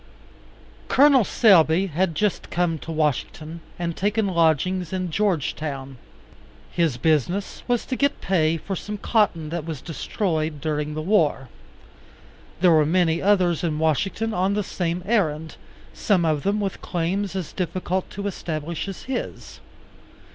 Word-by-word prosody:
Col. 275 -2 +5
Selby 185 -5 +4
had 175 -1 -1
just 210 +3 -1
come 170 -2 0
to 165 - -7
Washington, 155 +1 -2 0.2
and 170 -1 -3
taken 210 +2 0
lodgings 175 0 +1
in 185 -2 -2
Georgetown. 150 -8 -2 0.7
His 165 -7 +1
business 160 +8 0
was 245 -2 0
to 260 - -2
get 280 +2 +1
pay 165 -3 +1
for 195 +5 -5
some 210 +3 -5
cotton 195 -8 +1
that 170 0 -3
was 160 -3 -5
destroyed 160 - -2
during 150 0 -2
the 155 - -3
war. 155 - +1 1.1
There 180 -2 +6
were 155 -2 +5
many 165 +1 +2
others 185 -5 +2
in 160 -3 0
Washington 195 +8 0
on 190 +2 +1
the 210 - 0
same 175 -2 -3
errand, 160 -8 0 0.4
some 185 -5 +1
of 155 -2 +1
them 200 +4 0
with 195 -2 -3
claims 190 +3 -2
as 185 -5 -4
difficult 185 +1 -2
to 200 0 -6
establish 170 -3 -4
as 195 - -7
his. 260 -1 -5
175 Hz, 140 wpm, -23 LUFS, 155-195 Hz, 1.1 s, There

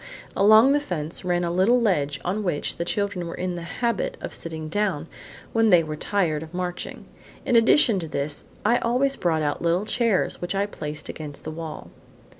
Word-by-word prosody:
Along 215 +6 +7
the 290 - +4
fence, 165 - -5
ran 175 -1 0
a 170 - -1
little 190 +8 +4
ledge 145 - +1
on 195 +4 -1
which 175 -6 -2
the 170 - -2
children 200 -2 -2
were 170 - -5
in 180 0 -2
the 175 - -5
habit 230 +6 -2
of - - -6
sitting 160 -1 -6
down 180 -3 -1 0.5
when 225 -1 +4
they 175 -4 +6
were 155 -1 -4
tired 160 -3 0
of 160 +2 -9
marching. 180 0 -4 0.4
In 245 - +2
addition 230 -2 +5
to 165 - -5
this, 145 0 -2 0.2
I 235 +3 +4
always 260 +4 +1
brought 160 -3 0
out 145 -1 -1
little 170 +4 +1
chairs, 230 -4 +1
which 175 +2 -3
I 200 +1 +1
placed 150 -6 -5
against 150 -2 -6
the 155 - -5
wall. 160 -1 -7
180 Hz, 195 wpm, -24 LUFS, 160-210 Hz, 0.5 s, Along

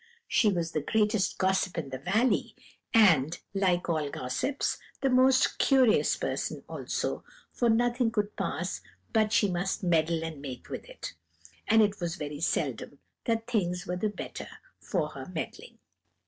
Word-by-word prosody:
She 215 - +4
was 170 -3 -1
the 155 - -1
greatest 210 +3 +1
gossip 190 -1 +1
in 155 -5 -3
the 130 -1 -5
valley, 215 - +1 0.4
and, 170 -9 +5 0.2
like 185 -3 +1
all 155 -4 0
gossips, 135 - -2 0.2
the 270 -1 +2
most 255 +1 +4
curious 260 -5 +4
person - - -3
also, - - -3 0.3
for 240 - +1
nothing 240 +1 +2
could 210 -2 -2
pass - - -3 0.3
but 215 -2 +3
she 205 - +4
must 185 +1 -2
meddle 165 -2 +2
and 160 -3 -6
make 130 -3 -8
with - - -6
it; - - -7 0.5
and 220 0 +6
it 205 -1 0
was 170 -1 -2
very 150 -4 -5
seldom 165 - -1 0.3
that 225 -1 0
things 180 -7 -1
were 180 - -2
the 210 +4 0
better 205 - -7 0.3
for - - -1
her - - -8
meddling. - - -6
195 Hz, 155 wpm, -29 LUFS, 165-225 Hz, 0.5 s, and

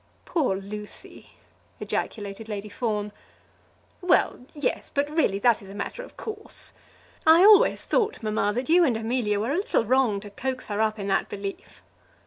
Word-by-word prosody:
"Poor 295 - +1
Lucy!" 205 +2 -8 0.5
ejaculated 210 +1 -4
Lady 210 0 -5
Fawn. 210 -2 -2 0.9
"Well; 350 -7 +2
yes; 290 -3 -2
but 285 0 0
really 305 -11 +2
that 230 +2 +3
is 195 - -12
a 195 - -9
matter - - -4
of - - -13
course. 425 -1 -6 0.5
I 325 +3 +7
always 420 0 +6
thought, 440 - 0
mamma, 215 -1 +1
that 250 +1 -2
you 345 +2 +6
and 250 -8 +2
Amelia 225 -2 0
were 225 +6 -1
a 305 - +1
little 380 - +1
wrong 245 -4 +2
to 205 -1 -10
coax 255 +4 -3
her 205 +1 -1
up 220 0 +1
in 200 -1 -4
that 195 - +1
belief." 200 -1 -7
225 Hz, 165 wpm, -26 LUFS, 205-290 Hz, 0.9 s, I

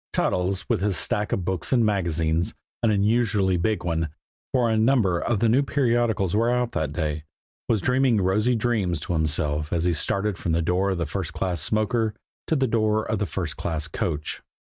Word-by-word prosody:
Toddles, 95 +1 0
with - - 0
his 100 -3 +1
stack 105 0 0
of 90 - -1
books 95 -3 -1
and 120 -3 +4
magazines, 85 -5 0 0.3
an 115 - +3
unusually 105 -2 +2
big 90 +2 0
one, 80 -2 -1 0.4
for 125 -2 +2
a 110 - +1
number 110 -6 +3
of 110 +1 -1
the 115 - +4
new 120 +5 +4
periodicals 120 - +1
were 115 +2 +2
out 125 -1 0
that 75 -2 -2
day, 75 -1 -2 0.5
was 110 -4 +1
dreaming 125 -3 +3
rosy 105 +6 +2
dreams 110 -8 0
to 90 - -3
himself 75 -1 0
as 85 -1 0
he 90 0 +2
started 100 +5 0
from 85 - -1
the 85 - +2
door 90 +4 +1
of 95 - -1
the 85 - -1
first 70 - -4
class 90 -4 -2
smoker 110 +3 0 0.3
to 160 - +1
the 135 -2 +2
door 110 -2 +1
of 110 -2 -1
the 105 - -1
first 85 -6 -4
class 80 -2 -2
coach. 75 -2 -3
100 Hz, 195 wpm, -24 LUFS, 85-115 Hz, 0.5 s, and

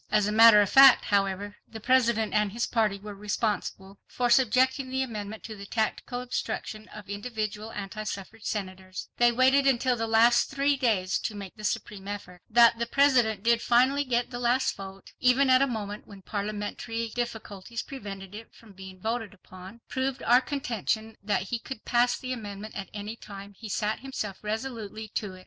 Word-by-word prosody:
As 210 -1 +3
a 210 - 0
matter 220 -1 +8
of 200 - +1
fact, 270 -1 +8
however, 200 0 0
the 220 - -9
President 235 -2 +2
and 210 -1 +2
his 235 +3 -1
party 215 -4 +1
were 205 +1 -9
responsible 200 -1 -3
for 245 -1 -1
subjecting 260 +2 +3
the 265 +1 0
amendment 215 -3 -6
to 220 - -7
the 200 -1 -10
tactical 240 +3 -2
obstruction 220 -3 -4
of 210 -1 -11
individual 215 0 -4
anti 205 +1 -6
suffrage 210 +1 -7
Senators. 185 -2 -5
They 240 0 +5
waited 265 +3 +4
until 255 -1 +2
the 225 -1 -2
last 230 +2 +4
three 280 +1 +1
days 210 -8 +1
to 215 - -4
make 200 -2 -8
the 215 - -12
supreme 205 -2 -3
effort. 200 -3 -7
That 235 0 +6
the 235 - -1
President 245 -7 +3
did 235 0 +3
finally 260 +4 +3
get 245 -2 -1
the 240 - -5
last 245 +2 +1
vote 195 0 -10
even 260 +2 +4
at 255 +1 +6
a 275 - +4
moment 210 -4 -5
when 200 -2 -13
parliamentary 210 +3 -4
difficulties 225 -2 -5
prevented 200 -7 -8
it 225 +2 -11
from 220 -3 -17
being 190 0 -11
voted 225 0 -3
upon, 185 +4 -13
proved 260 0 -2
our 245 +2 +5
contention 230 -5 -3
that 205 -2 0
he 240 - -2
could 230 -1 -9
pass 245 0 +2
the 255 -1 -4
amendment 210 -2 -7
at 195 - -6
any 210 +2 -6
time 200 -2 -10
he 215 +2 -9
set 210 +2 -1
himself 220 -7 -5
resolutely 220 -1 -5
to 200 -2 -4
it. - - -13
220 Hz, 185 wpm, -27 LUFS, 205-245 Hz, -, matter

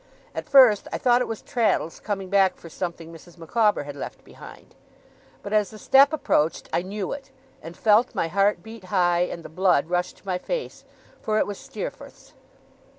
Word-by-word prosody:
At - - -6
first, 255 -7 +6
I - - -2
thought 245 -1 +3
it - - -1
was 225 - -6
Traddles 225 - 0
coming 195 -3 -4
back 195 -2 +3
for 165 - -12
something 170 -1 -6
Mrs. 170 +2 -15
Micawber 205 +2 +1
had 145 0 -8
left 140 - -8
behind; - - -14 0.7
but 200 - -5
as 210 -1 +2
the 215 - -12
step 275 +6 +5
approached, 165 - 0
I - - +2
knew 195 +1 -5
it, 275 -1 -7 0.3
and 165 +2 -10
felt 220 +2 +3
my 165 - 0
heart 200 +4 +1
beat 220 -3 -11
high, 180 -2 +2
and 175 -1 -2
the - - -5
blood 175 -1 +1
rush 180 0 0
to - - -25
my 185 -2 -2
face, - - -5 0.4
for 215 0 -1
it - - +2
was 205 - -6
Steerforth's. - - -9
195 Hz, 190 wpm, -24 LUFS, 175-220 Hz, 0.7 s, first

